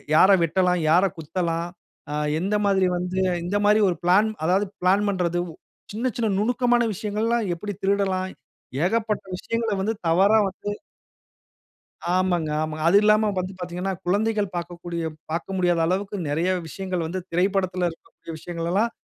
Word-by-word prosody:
யார 185 +4 +7
எ - - -2
வெட்டலாம்? 180 +2 +2
யார 175 +4 +5
குத்தலாம்? 165 +1 -2 0.4
ஆ - - -3 0.3
எந்தமாதிரி 195 0 +2
வந்து 180 +1 -2 0.2
இந்தமாரி 205 +4 +3
ஒரு 175 - 0
பிளான் 190 +5 +4
அதாவது 185 +5 +2 0.2
பிளான் 190 +3 +3
பண்றது 175 -3 0 0.5
சின்ன, 235 +5 -1
சின்ன 230 -2 +1
நுணுக்கமான 240 +3 +2
விஷயங்கள்லாம் 215 +3 -1
எப்பிடி 205 +4 -5
திருடலாம் 195 -1 0 0.6
ஏகப்பட்ட 220 +2 0
விஷயங்கள 230 +2 -2
வந்து 215 +3 0
தவறா 195 +6 +5
வந்து 190 +2 -7 1.5
ஆமாங்க, 180 -4 +1
ஆமாங்க. 155 0 -3
அது 185 +4 +6
இல்லாம 215 0 +4
வந்து 185 +1 -4
பார்த்தீங்கன்னா 180 +2 -3
குழந்தைகள் 205 +1 0
பார்க்கக்கூடிய 170 0 -5 0.3
பார்க்க 170 +4 -3
முடியாத 175 -2 +2
அளவுக்கு 195 +3 -1
நெறைய 165 +5 0 0.2
விஷயங்கள் 185 0 -3
வந்து 185 +3 -3
திரைப்படத்தில 185 0 +1
இருக்கக்கூடிய 165 0 -13
விஷயங்கள் 170 0 -4
எல்லாம் 220 +5 +2
185 Hz, 135 wpm, -24 LUFS, 175-205 Hz, 1.5 s, யார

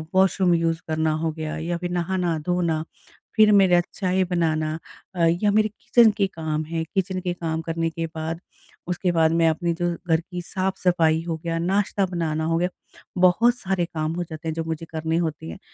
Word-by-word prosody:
Washroom 190 -1 +4
use 165 0 0
करना 160 0 +1
हो 165 -1 0
गया 155 0 -5
या 170 +2 -2
फिर 175 +1 -4
नहाना 175 -1 0
धोना 170 -3 0 0.5
फिर 215 -1 +6
मेरा 190 -3 +6
चाय 185 -1 +1
बनाना 160 -3 0 0.4
अ, - - -5 0.2
या 205 - +4
मेरे 215 +1 +3
किचन 220 +2 +4
के 195 - +2
काम 160 -3 -3
हैं, 165 +1 -2
किचन 190 -1 0
के 180 -1 -2
काम 165 -2 -3
करने 165 0 -1
के 165 0 -4
बाद 160 +1 -3 0.5
उसके 180 0 0
बाद 160 -2 +3
मैं 165 0 +4
अपने 170 +2 0
जो 175 +1 -1 0.2
घर 160 -1 +3
की 180 +1 -7
साफ़-सफ़ाई 175 -3 +1
हो 165 -1 -2
गया 165 -1 -1
नाश्ता 195 +3 +1
बनाना 165 -3 -2
हो 165 +1 +1
गया 180 +2 +1 0.5
बहुत 225 +7 +5
सारे 190 -5 -1
काम 155 -1 -3
हो 175 - -1
जाते 160 -1 -8
हैं 160 - -1
जो 165 - -2
मुझे 160 0 -4
करने 160 0 -1
होते 160 - -2
हैं। 80 - -8
170 Hz, 195 wpm, -24 LUFS, 160-185 Hz, 0.5 s, फिर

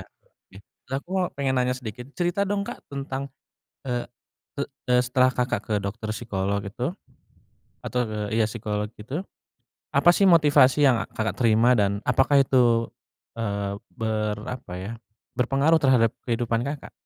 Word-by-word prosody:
oke. 95 - -19 0.3
Nah 135 - -1
aku 155 +6 -8 0.3
pengen 135 -1 0
nanya 125 0 0
sedikit, 125 0 -8
cerita 180 +3 0
dong, 200 -1 0
Kak, - - -9
tentang 140 0 -4 0.6
eee, 120 -1 -2 0.5
e - - +2 0.3
e - - +5
setelah 130 +1 +2
Kakak 125 -5 -1
ke 110 - -2
dokter 110 +2 -4
psikolog 100 -3 -2
itu, 120 - -4 0.9
atur 110 -4 -2
iya, 110 -1 +2
psikolog 105 -2 -3
itu. 130 +9 -5 0.7
Apa 175 - +5
sih 195 +1 +4
motivasi 145 -4 +5
yang 125 -5 +4
a - - -7
Kakak 110 -3 -2
terima, 115 +2 +4
dan 100 -3 +2
apakah 140 +2 +3
itu, 120 -3 +3 0.4
eee, 100 -3 -2 0.2
ber 110 -1 -2
apa 125 -8 -7
ya, 95 +4 -5 0.4
berpengaruh 140 +6 +2
terhadap 125 -5 +4
kehidupan 115 -1 -1
Kakak? 140 +3 -5
120 Hz, 145 wpm, -25 LUFS, 110-135 Hz, 0.9 s, e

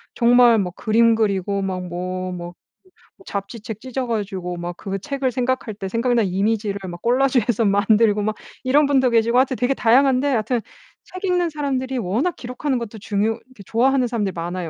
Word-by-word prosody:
정말 240 -1 +5
막 180 -3 -2
그림 230 +1 +3
그리고 200 -3 0
막 190 -1 -2
뭐 185 +1 -4
뭐 175 0 -7 0.6
뭐 385 - -20
잡지책 210 - -6
찢어 260 -1 -4
가지고 190 -5 -3
막 175 0 -5
그거 195 0 -4
책을 275 +4 -2
생각할 250 -2 -1
때 195 -1 -5
생각난 235 +1 +1
이미지를 200 +2 -1
막 175 0 -9
꼴라주해서 245 -2 +2
만들고 210 +1 +3
막 215 0 -1 0.3
이런 280 +3 +3
분도 265 -3 +3
계시고 235 +1 +3
하여튼 260 -1 +2
되게 250 +2 +1
다양한데 260 +3 +3
하여튼 235 -1 0 0.4
책 370 +2 -10
읽는 355 -2 +1
사람들이 265 -3 -2
워낙 235 - -1
기록하는 250 +1 -3
것도 225 -1 -7
중요 210 +1 0
이렇게 255 -5 -17
좋아하는 255 +3 +2
사람들이 210 -5 -2
많아요. 175 0 -4
230 Hz, 390 characters per minute, -21 LUFS, 200-255 Hz, 0.6 s, 정말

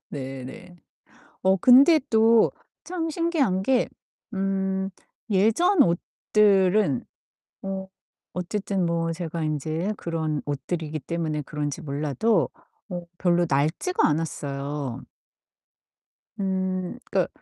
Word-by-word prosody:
네 135 -2 -6
네. 175 +7 -11 0.7
어 190 +1 +4
근데 275 - +7
또 225 0 +5 0.3
참 335 -2 -3
신기한게 265 - +1 0.4
음 190 0 -1 0.4
예전 225 - +4
옷들은 190 - +2 0.6
어 190 0 -4 0.5
어쨌든 190 +1 -2
뭐 165 0 0
제가 165 -1 -4
인제 155 +6 -1
그런 160 -3 -2
옷들이기 155 +2 -3
때문에 155 0 -2
그런지 150 +2 -4
몰라도 150 - 0 0.4
어 175 -2 -5
별로 175 -1 +3
낡지가 155 - +1
않았어요. 145 -3 -3 1.4
음 185 +1 -1
그니까 - - +1
180 Hz, 190 characters per minute, -25 LUFS, 155-205 Hz, 1.4 s, 근데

